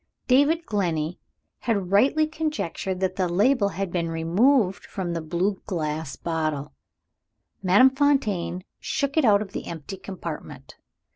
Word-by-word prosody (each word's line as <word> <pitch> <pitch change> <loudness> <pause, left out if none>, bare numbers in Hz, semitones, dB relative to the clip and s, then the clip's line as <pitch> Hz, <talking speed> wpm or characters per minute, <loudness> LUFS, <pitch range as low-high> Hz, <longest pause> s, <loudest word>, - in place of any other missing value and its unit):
David 285 +6 +4
Glenney 170 -5 -1 0.4
had 200 -6 -1
rightly 275 +10 +4
conjectured 300 - -3
that 185 -1 -1
the 185 -2 +1
label 205 +4 +3
had 195 0 -4
been 170 -2 -1
removed 190 +6 +2
from 180 -3 -4
the 165 - -2
blue 175 +5 -1
glass 155 -5 -3
bottle. 155 - -2 0.9
Madame 200 +8 +6
Fontaine 260 -11 +1 0.2
shook 280 -2 -2
it 315 -4 +4
out 210 -2 +5
of 195 - -13
the - - -6
empty 170 +3 -7
compartment. 175 -5 -8
190 Hz, 135 wpm, -25 LUFS, 170-255 Hz, 0.9 s, Madame